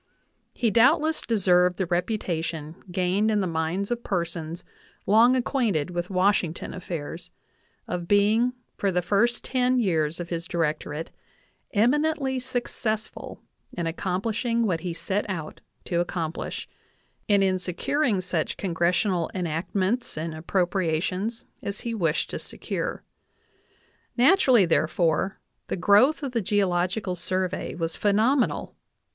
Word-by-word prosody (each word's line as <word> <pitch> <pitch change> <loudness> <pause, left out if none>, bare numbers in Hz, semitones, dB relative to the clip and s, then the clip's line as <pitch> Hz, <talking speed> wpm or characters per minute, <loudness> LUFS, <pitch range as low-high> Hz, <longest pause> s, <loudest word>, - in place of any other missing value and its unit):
He 230 -3 +1
doubtless 310 - +4
deserved 180 -5 +3
the 190 - 0
reputation 170 -4 -2 0.2
gained 185 +4 +1
in 210 -1 +2
the 195 - +1
minds 170 +5 -1
of 240 0 -2
persons 170 -2 -3 0.4
long 230 +5 +6
acquainted 230 - 0
with 175 0 -3
Washington 185 -3 +1
affairs, 175 -1 -6 0.6
of 175 -1 -3
being 215 +5 +3 0.2
for 195 - 0
the 180 0 0
first 205 +7 +2
ten 255 0 +1
years 165 -8 +1
of 170 -1 -5
his 170 -1 -3
directorate 155 -2 -2 0.6
eminently 270 +4 +2
successful 240 -4 -4 0.3
in 170 - -3
accomplishing 215 +7 -1
what 175 -6 0
he 175 +1 -4
set 190 +5 -2
out 160 -5 -5 0.2
to 170 - 0
accomplish, 170 -2 -3 0.6
and 200 -1 +5
in 185 -1 +2
securing 200 - 0
such 180 -3 -2
Con 185 -4 -3
gressional 175 +1 +1
enactments 185 +8 -1
and 160 +1 -3
appropriations 180 +5 -1 0.2
as 200 0 -5
he 235 - -3
wished 170 -7 0
to - - -4
secure. - - -4 1.1
Naturally, 255 - +5
therefore, 165 +3 +1
I - - -41 0.2
the - - -2
growth 210 - +4
of 275 - -2
the 235 -2 0
Geological 185 0 0
Survey 185 +1 -2
was 165 -1 -3
phenomenal. 220 +6 +1
185 Hz, 125 wpm, -26 LUFS, 170-225 Hz, 1.1 s, long